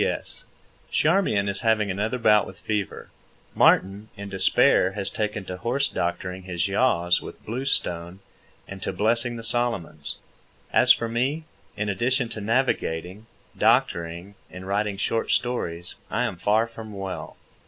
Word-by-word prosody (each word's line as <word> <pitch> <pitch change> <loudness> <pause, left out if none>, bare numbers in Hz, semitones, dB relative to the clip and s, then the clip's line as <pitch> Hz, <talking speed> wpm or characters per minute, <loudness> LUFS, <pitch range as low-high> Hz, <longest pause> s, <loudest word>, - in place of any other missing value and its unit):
P.S. - - 0 0.4
Charmian 155 - +2
is 100 0 +2
having 110 -3 +2
another 105 +6 -1
bout 105 -3 +4
with 95 - -11
fever. 105 -1 -4 0.4
Martin, 100 +3 +3
in 100 0 -7
despair, 95 0 +4
has 100 -1 -2
taken 105 -2 -3
to 90 - -6
horse 125 +8 0
doctoring 90 -1 -3
his 90 -2 -2
yaws 90 -5 +2
with - - -11
bluestone 95 -8 -2 0.5
and 95 0 -9
to - - -2
blessing 115 +5 +1
the 115 - -7
Solomons. 120 -5 -1 0.6
As - - +8
for 115 - +3
me, 130 +7 -1 0.3
in 105 - -1
addition 120 +5 +1
to 110 -2 -5
navigating, 105 -4 -1 0.3
doctoring, 85 +3 +1 0.2
and 90 0 -9
writing 100 +1 -1
short 115 +3 -1
stories, 90 -9 -1 0.2
I - - 0
am - - -2
far 105 +5 +2
from 115 -2 -10
well. 95 -1 -6
105 Hz, 145 wpm, -25 LUFS, 95-115 Hz, 0.6 s, As